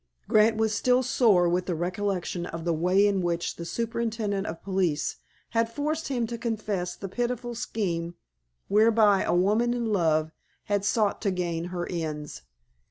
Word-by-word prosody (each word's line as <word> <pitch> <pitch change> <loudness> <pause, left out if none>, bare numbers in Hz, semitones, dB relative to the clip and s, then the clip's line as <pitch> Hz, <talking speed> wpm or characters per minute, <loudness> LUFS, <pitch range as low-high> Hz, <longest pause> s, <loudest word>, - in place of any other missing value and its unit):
Grant 215 +1 +4
was 220 -1 +1
still 250 +3 +3
sore 220 -8 +4
with 180 +1 0
the 180 - -1
recollection 180 0 -2
of 165 0 -6
the 170 - +1
way 180 +5 +3
in 200 -2 +2
which 170 -1 -2
the 170 - -6
superintendent 225 -2 -2
of 165 0 -6
police 185 -6 0 0.3
had 230 0 +1
forced 305 +5 -2
him 245 -4 0
to 235 +1 -5
confess 210 -6 -2
the 195 - -6
pitiful 240 +3 -2
scheme 175 -7 -3 0.5
whereby 210 -1 +4
a - - +1
woman 215 +7 +2
in 240 -1 -2
love 155 -4 +2 0.3
had 205 -1 0
sought 210 0 +1
to 205 - +1
gain 175 -3 -2
her 175 -1 -4
ends. 150 - -4
200 Hz, 165 wpm, -27 LUFS, 175-230 Hz, 0.5 s, Grant